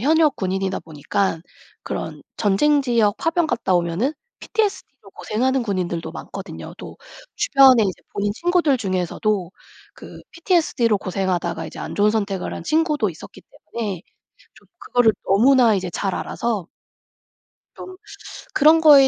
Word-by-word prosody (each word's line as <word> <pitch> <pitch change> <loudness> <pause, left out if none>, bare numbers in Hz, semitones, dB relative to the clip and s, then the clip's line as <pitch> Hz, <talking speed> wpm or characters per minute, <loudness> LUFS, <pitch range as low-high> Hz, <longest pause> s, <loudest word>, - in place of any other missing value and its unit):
현역 305 +2 +3
군인이다 190 0 -2
보니깐 165 +3 -2 0.4
그런 - - -5
전쟁 280 +8 +2
지역 230 -5 +2
파병 330 0 +1
갔다 230 -9 0
오면은 175 - 0 0.3
PTSD로 390 - -3
고생하는 255 +6 -1
군인들도 180 -5 -3
많거든요. - - -8
또 - - -10 0.4
주변에 265 -5 +5
이제 190 -2 -4
본인 205 0 -1
친구들 340 - +2
중에서도 185 -1 -1 0.4
그 - - -12
PTSD로 315 - +1
고생하다가 180 -4 -2
이제 - - -10
안 - - -6
좋은 205 +1 +3
선택을 200 -4 -2
한 - - -7
친구도 305 - +1
있었기 160 - -12 0.3
때문에 205 -7 -3 0.5
좀 - - -22
그거를 245 -3 +3
너무나 235 +3 +5
이제 185 -2 -3
잘 190 +2 -2
알아서 215 -7 -3 1.1
좀 370 - -9 0.6
그런 310 +2 +5
거에 285 -4 +8
220 Hz, 320 characters per minute, -21 LUFS, 190-275 Hz, 1.1 s, 거에